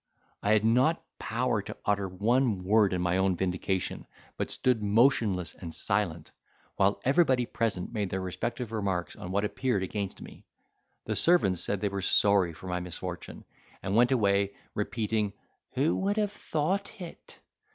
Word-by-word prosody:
I 105 Hz, -, +3 dB
had 110 Hz, 0 st, +3 dB
not 125 Hz, +9 st, +3 dB
power 115 Hz, -1 st, 0 dB
to -, -, -8 dB
utter 100 Hz, -2 st, +1 dB
one 110 Hz, +1 st, +1 dB
word 105 Hz, +1 st, +4 dB
in 90 Hz, -1 st, -1 dB
my 90 Hz, +1 st, +1 dB
own 95 Hz, -1 st, +2 dB
vindication, 95 Hz, +1 st, -2 dB, 0.3 s
but -, -, -3 dB
stood 125 Hz, -4 st, +1 dB
motionless 105 Hz, -, +2 dB
and 85 Hz, -3 st, -8 dB
silent, 85 Hz, -3 st, -1 dB, 0.4 s
while 100 Hz, +1 st, +2 dB
everybody 135 Hz, -3 st, +3 dB
present 110 Hz, -4 st, -2 dB
made 105 Hz, -4 st, -1 dB
their 95 Hz, -, -2 dB
respective 115 Hz, +5 st, -4 dB
remarks 95 Hz, -5 st, -2 dB
on 90 Hz, -, -8 dB
what 100 Hz, +2 st, +1 dB
appeared 120 Hz, -2 st, -1 dB
against 100 Hz, +1 st, -4 dB
me. -, -, -12 dB, 0.6 s
The -, -, -2 dB
servants 130 Hz, -, +3 dB
said 100 Hz, -, -1 dB
they 105 Hz, -, +1 dB
were 100 Hz, 0 st, -3 dB
sorry 100 Hz, -2 st, +4 dB
for 85 Hz, -, -13 dB
my 90 Hz, -1 st, -2 dB
misfortune, 90 Hz, 0 st, -7 dB, 0.4 s
and 95 Hz, +1 st, -1 dB
went 120 Hz, +3 st, +5 dB
away 100 Hz, -4 st, +2 dB, 0.2 s
repeating, 105 Hz, -1 st, -1 dB, 0.4 s
"Who 140 Hz, +5 st, +2 dB
would 200 Hz, +2 st, 0 dB
have 210 Hz, -2 st, +1 dB
thought 195 Hz, +5 st, -2 dB
it?" 175 Hz, -3 st, -10 dB
105 Hz, 160 wpm, -29 LUFS, 95-125 Hz, 0.6 s, went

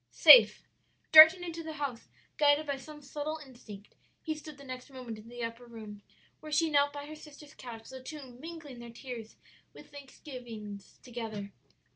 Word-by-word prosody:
"'Safe.' -, -, +7 dB, 0.4 s
"Darting 320 Hz, +3 st, +10 dB
into 335 Hz, -1 st, -6 dB
the 320 Hz, -1 st, -7 dB
house, 280 Hz, -6 st, -5 dB, 0.3 s
guided 295 Hz, +1 st, +3 dB
by 285 Hz, -2 st, -2 dB
some 295 Hz, +2 st, -12 dB
subtle 300 Hz, +3 st, -5 dB
instinct, 215 Hz, -6 st, -13 dB, 0.3 s
he 315 Hz, -, -2 dB
stood 305 Hz, -1 st, -11 dB
the 280 Hz, -, -13 dB
next 255 Hz, 0 st, -9 dB
moment 250 Hz, -5 st, -9 dB
in 220 Hz, +2 st, -14 dB
the 240 Hz, 0 st, -7 dB
upper 230 Hz, +1 st, -7 dB
room 215 Hz, -3 st, -11 dB, 0.4 s
where 310 Hz, -, -10 dB
she 315 Hz, +1 st, +1 dB
knelt 285 Hz, 0 st, +3 dB
by 285 Hz, 0 st, -8 dB
her 305 Hz, -, -10 dB
sister's 300 Hz, -1 st, -14 dB
couch, 230 Hz, -5 st, -10 dB
the 260 Hz, 0 st, -9 dB
two 275 Hz, -1 st, -9 dB
mingling 310 Hz, -4 st, -10 dB
their 235 Hz, 0 st, -10 dB
tears 230 Hz, -2 st, -9 dB, 0.4 s
and -, -, -13 dB
thanksgivings 245 Hz, -8 st, -11 dB
together. 220 Hz, -5 st, -7 dB
270 Hz, 170 wpm, -30 LUFS, 235-300 Hz, 0.4 s, Darting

